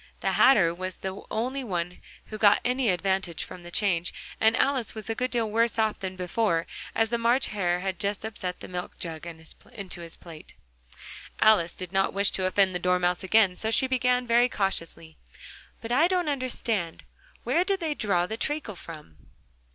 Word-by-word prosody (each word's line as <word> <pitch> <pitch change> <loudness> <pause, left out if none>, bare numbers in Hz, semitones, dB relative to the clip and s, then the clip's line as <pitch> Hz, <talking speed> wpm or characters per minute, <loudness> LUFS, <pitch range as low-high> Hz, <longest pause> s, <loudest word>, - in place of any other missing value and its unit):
The - - +1
Hatter 195 -11 +5
was 185 +1 -5
the 190 +1 -5
only 255 +5 -2
one 180 -5 -3 0.3
who 215 - -8
got 205 -1 +6
any 250 -1 +1
advantage 190 -1 0
from 180 - -9
the 175 - -10
change: 175 -3 +1 0.3
and 220 +1 +4
Alice 265 -5 +1
was 220 0 -4
a - - +1
good 250 +3 -2
deal 230 -4 -1
worse 230 +1 +1
off 220 -1 +1
than 190 -1 -5
before, 180 -1 0 0.3
as 225 0 +2
the 235 0 -1
March 240 +3 +2
Hare 180 -3 0
had 190 0 -3
just 205 0 -2
upset 185 -5 -5
the - - -7
milk 180 0 -6
jug 165 -1 -5
into 170 +3 -9
his 165 -1 -9
plate. 165 -3 -12 0.8
Alice 200 -6 +4
did 185 0 -7
not 195 0 +1
wish 200 0 +2
to 190 - -1
offend 190 0 +2
the 180 - -2
Dormouse 180 0 +1
again, 195 -1 +4
so 220 - -1
she 225 - +4
began 250 -1 +1
very 240 +1 +4
cautiously: 165 -6 -3 0.6
"But 230 - -6
I 295 +7 +5
don't 360 -3 0
understand. 235 - -2 0.4
Where 345 - +2
did 390 0 0
they 320 -3 -1
draw 195 -9 +1
the 220 +4 -5
treacle 295 -6 -3
from?" 155 - -11
200 Hz, 185 wpm, -27 LUFS, 180-235 Hz, 0.8 s, got